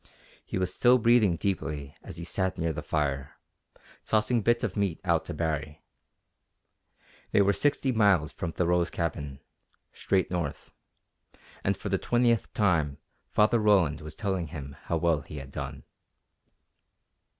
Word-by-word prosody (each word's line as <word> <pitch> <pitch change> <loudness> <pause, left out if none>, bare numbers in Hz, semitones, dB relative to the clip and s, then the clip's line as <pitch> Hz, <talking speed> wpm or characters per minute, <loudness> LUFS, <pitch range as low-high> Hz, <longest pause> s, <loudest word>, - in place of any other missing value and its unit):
He - - -4
was 90 0 0
still 125 +1 +5
breathing 115 -6 +4
deeply 75 -7 -3
as - - -10
he 85 - -6
sat 95 +2 -1
near 80 -1 -1
the 75 - -4
fire, 70 -4 -2 0.7
tossing 110 +2 +1
bits 120 +3 +2
of 105 -5 -2
meat 100 -5 0
out 85 -4 +1
to - - -5
Baree. 75 -1 -3 1.5
They 100 - +4
were 100 +1 +3
sixty 140 +2 +1
miles 100 - +3
from 85 - -4
Thoreau's 85 0 +1
cabin, 75 -5 -4 0.5
straight 95 -3 0
north, 85 -5 -4 0.9
and - - +1
for - - -5
the - - +1
twentieth 120 -3 +1
time 85 -9 +2 0.3
Father 110 +2 +3
Roland 95 -8 +3
was 75 0 -8
telling 95 -5 -2
him 70 -2 -8
how 85 - 0
well 80 -2 +2
he 75 - -10
had 70 -1 -8
done. - - -6
85 Hz, 145 wpm, -28 LUFS, 75-105 Hz, 1.5 s, still